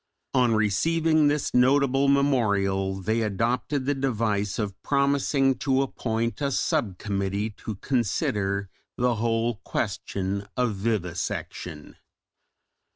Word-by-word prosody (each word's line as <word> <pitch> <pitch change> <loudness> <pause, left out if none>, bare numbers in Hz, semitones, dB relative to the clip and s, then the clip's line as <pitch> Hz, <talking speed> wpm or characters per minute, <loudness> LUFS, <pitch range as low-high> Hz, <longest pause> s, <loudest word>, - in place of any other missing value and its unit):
On 125 -3 +3
receiving 155 - +2
this 145 0 0
notable 135 +2 +4
memorial 100 -9 +2
they 110 +4 -1
adopted 120 +6 -1
the 145 - +2
device 110 -7 -1
of 105 -2 -4
promising 140 -1 +2
to 135 0 +2
appoint 115 -1 -2
a 140 - +1
sub 105 -7 0
committee 100 +1 -2
to 110 - -5
consider 100 -4 -1 0.3
the 120 -2 +1
whole 115 0 0
question 100 -1 -3
of 125 -3 +1
vivisection. 90 -6 -4
115 Hz, 105 wpm, -26 LUFS, 100-135 Hz, 0.3 s, notable